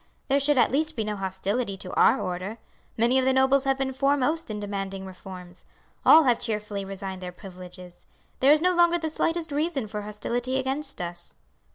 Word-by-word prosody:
There 275 +1 +4
should 285 0 +2
at - - +4
least 310 +3 0
be 220 - -1
no 210 0 -3
hostility 195 +3 -2
to 185 -1 -8
our - - +4
order. 185 +4 -4 0.4
Many 240 +4 +3
of 260 - 0
the 265 - +4
nobles 265 +1 +3
have 270 0 +2
been 265 0 -2
foremost 285 +3 +1
in 210 -1 -4
demanding 195 -1 -4
reforms. 180 -1 -11 0.4
All 320 - +8
have 245 -4 +3
cheerfully 210 -4 -2
resigned 195 -1 -6
their 180 -1 -6
privileges. 180 -1 -12 0.3
There 270 +2 +5
is 305 +2 +4
no 365 0 +3
longer 345 0 +4
the 320 -2 -3
slightest 330 0 -1
reason 290 -4 -1
for 210 0 -5
hostility 240 +5 -3
against 270 -1 -3
us." 175 0 -7
230 Hz, 190 wpm, -26 LUFS, 195-275 Hz, 0.4 s, All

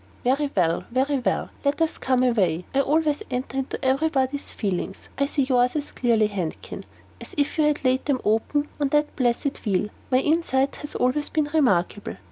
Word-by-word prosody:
"Very 275 +4 +1
well, 170 -3 +2
very 265 +3 +1
well. 250 - -1
Let 280 +2 +1
us 325 -1 0
come 255 -1 +2
away. 185 -9 +1
I 275 - +4
always 300 +1 +1
enter 260 +1 -3
into 265 +1 -4
every 275 +5 +2
body's 275 -1 0
feelings. 190 -2 -3
I 280 - +2
see 280 -1 0
yours 250 -1 +2
as 295 -1 -3
clearly, 230 -3 +2
Handkin, 190 -6 -5 0.4
as - - -10
if 285 +2 0
you 305 - +5
had 295 -2 0
laid 255 +1 +2
them 280 -3 +1
open 225 +7 +1
on 290 - +2
that 295 +2 +1
blessed 255 +2 0
wheel. 205 -1 0 0.2
My 255 - +4
insight 275 -2 +1
has 295 - -8
always 260 +4 +1
been 305 -2 0
remarkable. 205 - +1
265 Hz, 185 wpm, -24 LUFS, 235-290 Hz, 0.4 s, you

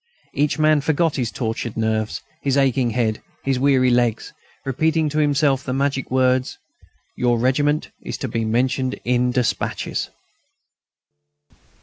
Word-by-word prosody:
Each 145 +2 +1
man 155 -1 +4
forgot 160 +1 +1
his 120 -4 -1
tortured 115 -1 -4
nerves, 110 -1 -1 0.2
his 140 -1 +1
aching 130 -3 +2
head, 110 -2 -1 0.2
his 135 -2 0
weary 130 -2 +3
legs, 120 -2 +1 0.3
repeating 155 +4 +1
to 150 +1 -1
himself 140 -2 +2
the 130 - -3
magic 135 0 -1
words: 130 0 +1 0.6
"Your 120 -1 +1
regiment 145 +5 +1
is - - -5
to 135 - -4
be 115 -1 -2
mentioned 130 +3 0
in 125 0 +2
despatches!" 125 -2 -1
130 Hz, 130 wpm, -21 LUFS, 120-140 Hz, 0.6 s, man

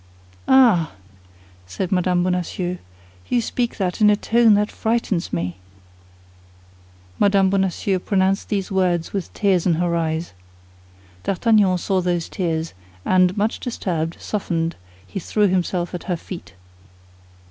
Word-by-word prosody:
"Ah," 230 - +5 0.7
said 175 - -4
Mme. 180 -1 +2
Bonacieux, 180 0 -2 0.5
"you 245 - +2
speak 235 +1 -2
that 190 +2 -2
in 210 - +7
a 210 - +5
tone 225 +1 +4
that 210 +1 +1
frightens 220 -6 -1
me!" 85 +1 -3 1.6
Mme. 200 -1 +4
Bonacieux 190 0 0
pronounced 195 +1 0
these 200 -2 -2
words 180 -3 0
with 195 -3 -3
tears 190 -4 +2
in 170 - +3
her 170 +1 0
eyes. 160 - -2 0.9
D'Artagnan 200 -2 +3
saw 185 +1 0
those 175 -2 -1
tears, 165 -3 -2 0.3
and 185 +1 +3
much 210 +2 0
disturbed, 170 -9 -3
softened, 165 -5 -2 0.3
he 195 - -5
threw 210 +4 +1
himself 180 -1 -1
at 175 - -6
her 180 - -1
feet. 170 - -10
185 Hz, 125 wpm, -21 LUFS, 175-205 Hz, 1.6 s, in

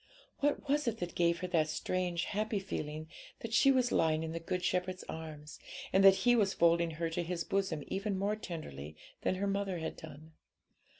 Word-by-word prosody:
What 290 +1 0
was 290 0 +1
it 230 -1 0
that 175 -3 -4
gave 170 0 +2
her 180 - -2
that 160 -4 +2
strange, 175 +2 -1
happy 215 +1 -1
feeling 155 -5 -4 0.3
that 230 0 -5
she 275 - +6
was 255 -2 +3
lying 160 0 +2
in 160 - -3
the 165 - -3
Good 180 +2 -3
Shepherd's 185 0 -1
arms, 155 -2 -8 0.3
and 190 - +5
that 195 0 +7
He 245 0 +6
was 200 -4 +2
folding 170 0 +4
her 165 0 0
to 165 - -1
His 170 0 -2
bosom 190 -7 -1
even 200 0 -2
more 200 +2 0
tenderly 80 - -7 0.3
than - - +1
her 195 +2 -1
mother 195 -2 -1
had 160 -1 -4
done? 155 0 -11
180 Hz, 195 wpm, -33 LUFS, 160-200 Hz, 0.3 s, that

